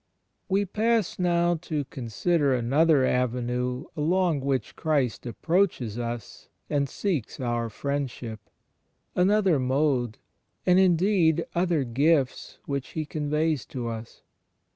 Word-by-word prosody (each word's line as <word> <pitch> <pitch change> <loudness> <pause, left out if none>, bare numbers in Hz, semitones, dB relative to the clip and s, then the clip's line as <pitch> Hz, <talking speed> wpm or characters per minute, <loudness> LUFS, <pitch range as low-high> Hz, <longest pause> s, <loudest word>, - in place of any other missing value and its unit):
We 195 +1 +2
pass 220 0 0
now 175 -1 +2
to 155 -4 -2
consider 135 - 0
another 135 +4 +3
avenue 125 +1 -1
along 170 0 +1
which 135 -1 -2
Christ 140 -7 0
approaches 145 - 0
us 120 -2 -6 0.2
and 140 -2 +1
seeks 170 - -2
our 120 -2 -1
friendship; 125 -3 -4 0.7
another 190 -3 +3
mode, 130 -3 +1 0.5
and, 180 +1 +5
indeed, 175 -2 +3
other 170 -4 +1
gifts 135 +3 +1
which 140 -2 -4
He 155 -1 -2
conveys 150 0 -1
to 120 -3 -4
us. 115 0 -8
145 Hz, 110 wpm, -26 LUFS, 125-170 Hz, 0.7 s, and